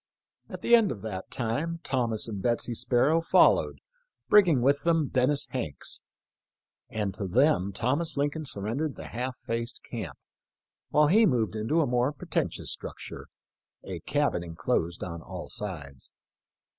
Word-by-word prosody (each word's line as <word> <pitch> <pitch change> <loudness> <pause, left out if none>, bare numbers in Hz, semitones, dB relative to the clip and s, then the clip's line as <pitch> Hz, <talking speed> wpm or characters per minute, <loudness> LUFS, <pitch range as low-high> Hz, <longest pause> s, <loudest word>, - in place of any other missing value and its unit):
At - - -8
the 235 - +2
end 225 -4 +6
of 100 - -7
that 95 -4 -5
time 145 +9 -2
Thomas 120 -5 0
and 105 -4 -5
Betsy 120 +1 0
Sparrow 135 +8 +3
fol 165 - +6
lowed, - - -4 0.5
bringing 175 -12 +6
with 140 +2 +3
them 165 -4 +2
Dennis 140 +3 +2
Hanks; 80 - -3 0.9
and 105 -3 -2
to 100 0 -4
them 110 - +3
Thomas 140 - 0
Lincoln 145 +2 -1
surrendered 130 +6 -2
the - - -9
"half 125 +2 -4
faced 115 +1 -3
camp," - - -6 0.7
while 150 0 +4
he 215 +5 +6
moved 115 - +1
into 115 +10 +1
a - - +2
more 125 +1 +1
pretentious 150 - -3
structure - - -8 0.3
— - - -50
a - - -6
cabin 85 - 0
enclosed 85 0 -2
on 85 -2 -6
all 90 +2 -8
sides. 75 - -6
120 Hz, 150 wpm, -28 LUFS, 105-150 Hz, 0.9 s, end